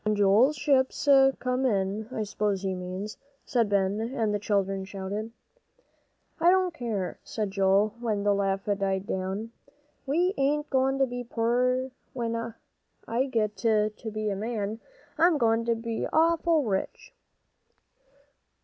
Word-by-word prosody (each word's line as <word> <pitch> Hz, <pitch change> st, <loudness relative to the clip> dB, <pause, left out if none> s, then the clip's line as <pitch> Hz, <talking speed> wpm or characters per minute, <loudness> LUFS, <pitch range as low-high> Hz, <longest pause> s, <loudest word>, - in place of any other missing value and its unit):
"When 215 Hz, 0 st, +1 dB
Joel's 205 Hz, +8 st, +4 dB
ships 280 Hz, -1 st, +1 dB, 0.3 s
come 255 Hz, +1 st, -1 dB
in, 205 Hz, -2 st, 0 dB
I 220 Hz, -, -2 dB
s'pose 205 Hz, -2 st, -1 dB
he 190 Hz, -1 st, -1 dB
means," 185 Hz, +3 st, -6 dB, 0.3 s
said 235 Hz, -6 st, +1 dB
Ben, 200 Hz, 0 st, +1 dB
and 225 Hz, -2 st, -1 dB
the 205 Hz, -, 0 dB
children 195 Hz, -2 st, 0 dB
shouted. 200 Hz, +3 st, -5 dB, 1.1 s
"I 335 Hz, +2 st, +5 dB
don't 370 Hz, -1 st, +3 dB
care," 220 Hz, -, -3 dB
said 210 Hz, -3 st, -3 dB
Joel, 195 Hz, +2 st, +3 dB
when 215 Hz, -4 st, -1 dB
the 205 Hz, 0 st, +3 dB
laugh 195 Hz, -1 st, -1 dB
died 195 Hz, -2 st, -1 dB
down, 195 Hz, +4 st, -3 dB, 0.6 s
"we 350 Hz, +7 st, +2 dB
ain't 295 Hz, +2 st, 0 dB
goin' 265 Hz, 0 st, +2 dB
to 270 Hz, -, +3 dB
be 245 Hz, -1 st, -5 dB
poor 250 Hz, +3 st, 0 dB, 0.2 s
when 230 Hz, -2 st, -3 dB, 0.5 s
I 240 Hz, +3 st, +1 dB
git 215 Hz, -5 st, 0 dB
to 215 Hz, 0 st, +2 dB, 0.2 s
be 215 Hz, 0 st, -2 dB
a -, -, -2 dB
man. 215 Hz, 0 st, -3 dB, 0.4 s
I'm 335 Hz, -1 st, +5 dB
goin' 230 Hz, -2 st, +2 dB
to 235 Hz, 0 st, +2 dB
be 230 Hz, 0 st, -3 dB
awful 330 Hz, -1 st, +3 dB
rich." 215 Hz, -, -3 dB
220 Hz, 140 wpm, -27 LUFS, 200-255 Hz, 1.1 s, I